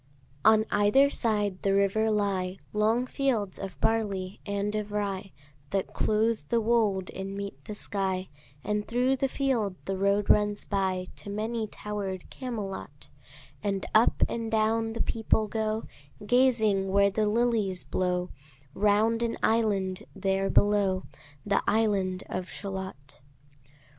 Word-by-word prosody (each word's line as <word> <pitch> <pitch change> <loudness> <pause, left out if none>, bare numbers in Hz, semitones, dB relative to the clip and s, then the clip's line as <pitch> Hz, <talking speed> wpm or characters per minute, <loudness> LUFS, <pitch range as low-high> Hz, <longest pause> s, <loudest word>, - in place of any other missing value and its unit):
On 220 0 +6
either 270 +8 +4
side 210 -7 0
the 195 0 +2
river 200 +3 +2
lie 195 -3 0 0.2
Long 220 +4 +2
fields 245 -9 -1
of 190 -7 -7
barley 200 -3 0
and 200 +1 -1
of 210 -1 -3
rye, 200 -2 -2 0.4
That 195 +2 -2
clothe 220 +1 +1
the 235 - +3
wold 215 -5 +1
and 195 +1 -5
meet 200 0 -6
the 210 - -6
sky; 190 -2 -2 0.3
And 210 0 -1
thro' 250 +3 +2
the 270 +1 0
field 255 -8 0
the 195 - -2
road 200 +1 +2
runs 210 0 +3
by 190 -2 -1
To - - -8
many 220 +2 -2
tower'd 200 -3 -5
Camelot; 215 -7 -6 0.5
And 200 -2 -1
up 220 +2 +4
and 230 -1 -3
down 225 0 +1
the 230 - -1
people 220 -1 +1
go, 220 0 -1 0.4
Gazing 220 -5 +3
where 200 +1 +3
the 215 +1 +1
lilies 215 -4 +1
blow 180 -1 -1 0.4
Round 210 +3 +2
an 235 -1 -1
island 200 -5 +1
there 195 0 0
below, 200 -3 +3 0.4
The 205 - +2
island 200 -4 +1
of 185 0 -4
Shalott. 190 -9 -7
205 Hz, 135 wpm, -28 LUFS, 195-225 Hz, 0.5 s, On